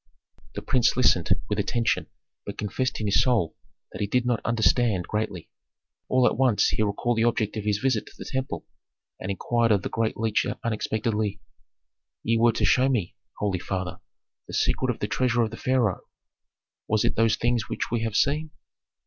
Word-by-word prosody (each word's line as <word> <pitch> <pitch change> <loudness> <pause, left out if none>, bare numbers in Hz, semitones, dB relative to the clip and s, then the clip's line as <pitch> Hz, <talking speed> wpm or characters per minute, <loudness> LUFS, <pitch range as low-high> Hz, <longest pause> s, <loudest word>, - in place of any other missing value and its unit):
The - - -5
prince 125 -1 +2
listened 100 -9 +3 0.2
with 105 0 -1
attention, 115 +3 0 0.4
but 100 - -7
confessed 130 +5 -2
in 105 -2 -1
soul 110 -6 +2 0.4
that - - -7
he 100 - 0
did 125 +3 +1
not 120 -3 0
understand 110 -3 +2
greatly. 105 -5 -3 0.6
All 130 -1 +4
at - - +3
once 125 -5 +3
he - - -1
recalled 110 +3 0
the 115 - +3
object 115 -3 +1
of 105 -1 -4
his 105 -1 +1
visit 125 -1 0
to - - -13
the - - -8
temple, 130 0 -3 0.5
and 95 - -5
inquired 115 +4 +1
of 100 -3 +3
the - - -3
great 115 -1 -1
leech 110 -1 +1 0.2
unexpectedly, 110 -2 -1 0.8
"Ye 115 - +2
were 120 +1 +5
to - - 0
show 130 +1 +4
me, 110 -10 -1 0.2
holy 100 -3 -1
father, 95 -1 -4 0.5
the - - -6
secret 130 - +1
of 125 - -1
the 105 - 0
treasure 120 +3 +1
of 110 - -2
the - - -6
pharaoh. 125 -7 +1 0.9
Was 110 -1 +2
it - - +1
those 115 -1 +3
things 120 0 0
which - - -3
we 120 -1 0
have 115 -2 -2
seen?" 150 +6 +1
115 Hz, 185 wpm, -26 LUFS, 105-120 Hz, 0.9 s, were